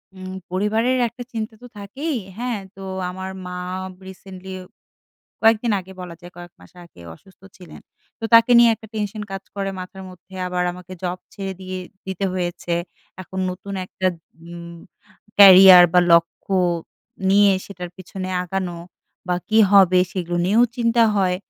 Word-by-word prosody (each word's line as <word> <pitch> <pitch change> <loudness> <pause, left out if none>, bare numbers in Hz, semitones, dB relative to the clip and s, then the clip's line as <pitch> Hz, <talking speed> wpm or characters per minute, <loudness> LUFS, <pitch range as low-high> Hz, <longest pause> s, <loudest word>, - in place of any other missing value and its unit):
উম 185 0 -8 0.2
পরিবারের 220 +7 +1
একটা 240 +2 -9
চিন্তা 220 0 -4
তো 245 - -11
থাকেই। 265 +9 -4 0.2
হ্যাঁ? 240 -3 -3 0.2
তো 195 - -12 0.3
আমার 190 +1 -6 0.2
মা 180 0 -6 0.4
বা 190 - -19
রিসেন্টলি 190 0 -11 0.9
কয়েকদিন 225 0 +3
আগে 190 +1 -13
বলা 180 -2 -8
যায় 175 0 -13
কয়েক 175 -1 -11
মাস 90 - -18
আগে 170 - -18
অসুস্থ 185 - -22 0.2
ছিলেন, 180 -2 -13 0.4
তো 225 - -8
তাকে 230 +2 +7
নিয়ে 235 -1 +7
একটা 220 - -14
টেনশন 210 0 -3
কাজ 195 0 -5
করে 195 -1 -3
মাথার 190 +1 -9
মধ্যে, 185 +1 -17
আবার 180 0 -1
আমাকে 180 0 -12
জব 180 0 -3 0.2
ছেড়ে 195 -1 -5
দিয়ে 185 0 -6 0.3
দিতে 190 +1 -3
হয়েছে, 175 -1 -3 0.5
এখন 190 +1 -9
নতুন 195 +2 -7
একটা 185 - -3 0.5
উম 170 0 -9 0.6
ক্যারিয়ার 190 -2 +10
বা, 180 - +6
লক্ষ্য 170 +3 +2 0.8
নিয়ে 200 0 +5
সেটার 180 -3 -8
পিছনে 185 0 -7
আগানো 180 -1 -4 0.5
বা 180 - +2
কী 220 - +3
হবে? 185 -2 +6
সেগুলো 175 -2 -3
নিয়েও 220 +6 +4
চিন্তা 235 -1 +2
হয়। 185 -2 +1
190 Hz, 155 wpm, -21 LUFS, 180-210 Hz, 0.9 s, ক্যারিয়ার